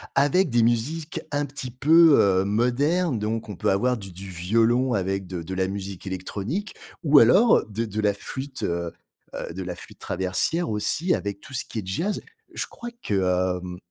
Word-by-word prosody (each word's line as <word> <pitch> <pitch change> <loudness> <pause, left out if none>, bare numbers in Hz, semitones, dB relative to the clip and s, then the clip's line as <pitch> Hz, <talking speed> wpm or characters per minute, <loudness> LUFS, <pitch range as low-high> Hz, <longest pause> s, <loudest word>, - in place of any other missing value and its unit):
avec 145 +6 +3
des 120 0 +3
musiques 140 +8 0
un 145 0 0
petit 135 -2 -7
peu, 155 +5 +6
heu, 95 -1 +3
modernes. 125 - +1
Donc 110 +1 -3
on 105 - -5
peut - - 0
avoir 125 +6 +1
du 95 -3 -9
du 95 +2 -9
violon 115 +8 +2
avec 95 -1 -1
de 90 -1 -5
de 95 - -6
la 95 0 +1
musique 95 -1 -6
électronique, 100 - -4 0.3
ou 145 -2 +7
alors 195 - +5
de 110 +2 -3
de 105 -1 -5
la 105 -1 +2
flûte, 130 +6 -7
heu 85 0 -2 0.4
heu - - -5
de 95 - -5
la 90 -1 -5
flûte - - -12
traversière 95 - -1
aussi, 150 - +1
avec 100 0 -4
tout 140 - -13
ce 130 - -1
qui 110 - -5
est 100 - -6
jazz. 175 - -1 0.3
Je - - -1
crois 240 - -8
que, 90 -2 +1
hem, 90 0 -7
110 Hz, 190 wpm, -25 LUFS, 95-140 Hz, 0.4 s, ou